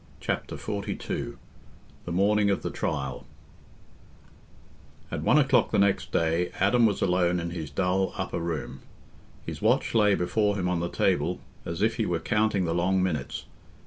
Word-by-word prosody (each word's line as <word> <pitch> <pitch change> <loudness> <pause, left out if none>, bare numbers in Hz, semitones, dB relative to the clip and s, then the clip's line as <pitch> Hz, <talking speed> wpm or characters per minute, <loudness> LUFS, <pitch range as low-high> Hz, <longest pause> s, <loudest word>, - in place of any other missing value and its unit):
Chapter - - -3
XLII 100 -2 -4 1.1
The 85 - -5
Morning 100 +3 +3
of 100 - 0
the - - -2
Trial 65 -2 -3 1.9
At - - -3
one 145 - +4
o'clock 130 -5 +4
the - - +1
next 100 -1 +2
day, 85 +2 +1
Adam 115 +4 +4
was 100 - -1
alone 90 -1 +2
in 85 0 -4
his 80 -4 -5
dull 95 +5 0
upper - - -2
room; 85 -3 -4 0.7
his - - -6
watch - - +2
lay 105 -3 +4
before 105 +3 +1
him 90 -3 -1
on 90 -1 0
the 85 +1 -2
table, - - +1 0.3
as 85 +4 -2
if 110 +1 +1
he 110 - 0
were 85 - 0
counting 105 +1 +1
the 85 - 0
long 90 +2 +2
minutes. 75 -7 -3
95 Hz, 160 wpm, -27 LUFS, 85-105 Hz, 1.9 s, one